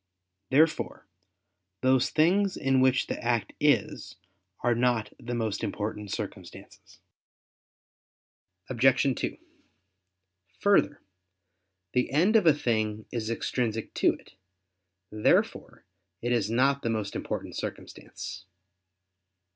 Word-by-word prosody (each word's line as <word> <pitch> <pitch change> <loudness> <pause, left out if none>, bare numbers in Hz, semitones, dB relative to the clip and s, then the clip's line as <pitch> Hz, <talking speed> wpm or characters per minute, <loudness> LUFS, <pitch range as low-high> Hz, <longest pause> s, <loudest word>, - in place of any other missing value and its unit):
Therefore 155 +4 +2 0.8
those 130 0 +3
things 185 +5 +2
in 135 -1 +2
which 130 0 +3
the - - -5
act 120 -2 0
is 145 -8 +1 0.5
are 120 0 +2
not 120 -3 0
the 120 +1 -5
most 110 -3 -2
important 105 -1 -4
circumstances. - - -8 1.7
Obj. 130 +2 +3
2: - - -3 1.2
Further, 200 -7 +2 0.9
the 125 0 +1
end 175 +10 +3
of 210 -6 +5
a 160 - +8
thing 110 -5 -1
is 115 -3 -3
extrinsic 115 -1 -2
to - - +3
it. - - -18 0.8
Therefore 105 0 0 0.4
it 120 - -1
is 115 -4 +1
not 135 +4 +2
the 115 - -2
most 105 -3 -2
important - - -4
circumstance. 95 +2 -7
120 Hz, 105 wpm, -28 LUFS, 110-140 Hz, 1.7 s, a